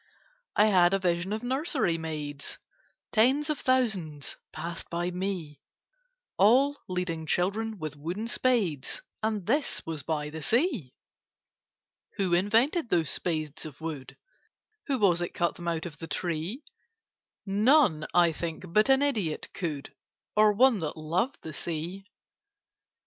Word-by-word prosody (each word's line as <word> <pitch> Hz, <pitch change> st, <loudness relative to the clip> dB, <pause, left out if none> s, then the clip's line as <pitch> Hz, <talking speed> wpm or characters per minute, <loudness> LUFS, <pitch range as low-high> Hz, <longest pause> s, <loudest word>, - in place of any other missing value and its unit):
I 210 Hz, -, +6 dB
had 185 Hz, -3 st, +5 dB
a -, -, 0 dB
vision 180 Hz, 0 st, 0 dB
of 215 Hz, +2 st, -2 dB
nursery 260 Hz, -, 0 dB
maids; 150 Hz, -3 st, -5 dB, 0.5 s
Tens 270 Hz, +7 st, +3 dB
of 300 Hz, -, -2 dB
thousands 195 Hz, -, 0 dB, 0.2 s
passed 170 Hz, 0 st, -5 dB
by 175 Hz, +1 st, -1 dB
me— 180 Hz, -6 st, -4 dB, 0.8 s
All 260 Hz, +9 st, +5 dB
leading 175 Hz, -3 st, -2 dB
children 210 Hz, +6 st, 0 dB
with 155 Hz, -4 st, -5 dB
wooden 170 Hz, +9 st, -4 dB
spades, 215 Hz, -, 0 dB, 0.2 s
And 215 Hz, -4 st, -1 dB
this 280 Hz, +7 st, 0 dB
was 160 Hz, -3 st, -4 dB
by 150 Hz, +1 st, -2 dB
the 160 Hz, +1 st, -6 dB
Sea. 235 Hz, -, 0 dB, 1.2 s
Who 190 Hz, -3 st, +1 dB
invented 225 Hz, -, +3 dB
those 165 Hz, -7 st, +2 dB
spades 155 Hz, -3 st, -2 dB
of 145 Hz, -3 st, -12 dB
wood? 155 Hz, -5 st, -6 dB, 0.7 s
Who 275 Hz, -3 st, +1 dB
was 180 Hz, -6 st, +3 dB
it 175 Hz, -, -3 dB
cut 170 Hz, -2 st, +1 dB
them 175 Hz, -, -8 dB
out 165 Hz, -2 st, -1 dB
of 165 Hz, -3 st, -8 dB
the 165 Hz, -, -6 dB
tree? 175 Hz, -, -3 dB, 0.8 s
None, 205 Hz, -, +4 dB
I 175 Hz, -1 st, +5 dB
think, 165 Hz, +1 st, -5 dB
but 215 Hz, +4 st, +4 dB
an 270 Hz, +1 st, +5 dB
idiot 210 Hz, -, -1 dB
could— 155 Hz, -7 st, -4 dB, 0.4 s
Or 215 Hz, 0 st, +6 dB
one 235 Hz, +1 st, +4 dB
that 155 Hz, -2 st, -4 dB
loved 170 Hz, -, -1 dB
the 160 Hz, -, -6 dB
Sea. 170 Hz, +5 st, -4 dB
180 Hz, 140 wpm, -28 LUFS, 160-225 Hz, 1.2 s, I